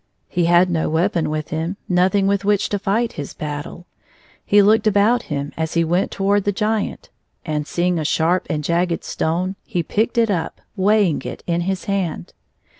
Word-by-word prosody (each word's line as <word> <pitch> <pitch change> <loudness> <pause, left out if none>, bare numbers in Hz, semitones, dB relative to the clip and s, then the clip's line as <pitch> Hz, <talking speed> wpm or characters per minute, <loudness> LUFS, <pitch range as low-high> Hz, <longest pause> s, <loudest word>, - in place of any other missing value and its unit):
He 175 -2 0
had 175 +1 +4
no 160 -2 0
weapon 170 +1 +1
with 155 0 -3
him, 165 +3 -3
nothing 185 +2 +2
with 200 0 +1
which 205 0 +1
to 205 - -1
fight 220 +4 0
his 145 -2 -7
battle. 150 +3 -6 0.6
He 205 0 +5
looked 215 +2 +4
about 215 +4 +3
him 145 -1 -3
as 160 0 -3
he 170 - +3
went 175 +3 +1
toward 200 +1 +1
the 205 - +1
Giant, 215 +1 -2 0.3
and 150 -2 -2
seeing 175 0 0
a - - -2
sharp 165 +4 +1
and 150 -1 -2
jagged 170 +2 0
stone, 180 +4 -2
he 175 - -2
picked 220 +8 -1
it 230 -2 +3
up, 170 -4 -2 0.2
weighing 200 -4 +2
it - - -7
in 170 0 0
his 190 +1 -2
hand. 180 - -2
180 Hz, 185 wpm, -20 LUFS, 160-200 Hz, 0.6 s, He